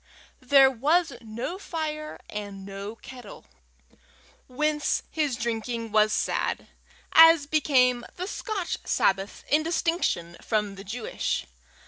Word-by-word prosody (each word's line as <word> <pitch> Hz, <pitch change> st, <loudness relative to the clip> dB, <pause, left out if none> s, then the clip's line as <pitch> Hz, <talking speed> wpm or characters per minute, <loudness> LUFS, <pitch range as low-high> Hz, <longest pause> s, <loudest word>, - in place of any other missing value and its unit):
There 270 Hz, 0 st, +6 dB
was 300 Hz, +5 st, +1 dB
no 235 Hz, -, -5 dB
fire 305 Hz, -4 st, -5 dB
and 200 Hz, -2 st, -7 dB
no 200 Hz, +2 st, -7 dB
kettle, 245 Hz, -2 st, -12 dB, 1.0 s
whence 300 Hz, +3 st, 0 dB
his 295 Hz, -5 st, 0 dB
drinking 230 Hz, -1 st, -3 dB
was 215 Hz, 0 st, +4 dB
sad, -, -, -1 dB, 0.5 s
as 325 Hz, -2 st, +8 dB
became 260 Hz, -5 st, +2 dB
the 360 Hz, -, -4 dB
Scotch 400 Hz, -2 st, -3 dB
Sabbath 195 Hz, +1 st, 0 dB
in 300 Hz, +2 st, +3 dB
distinction 330 Hz, -, -1 dB
from 210 Hz, -3 st, -1 dB
the 195 Hz, 0 st, -10 dB
Jewish. 225 Hz, +4 st, -3 dB
250 Hz, 110 wpm, -26 LUFS, 215-310 Hz, 1.0 s, as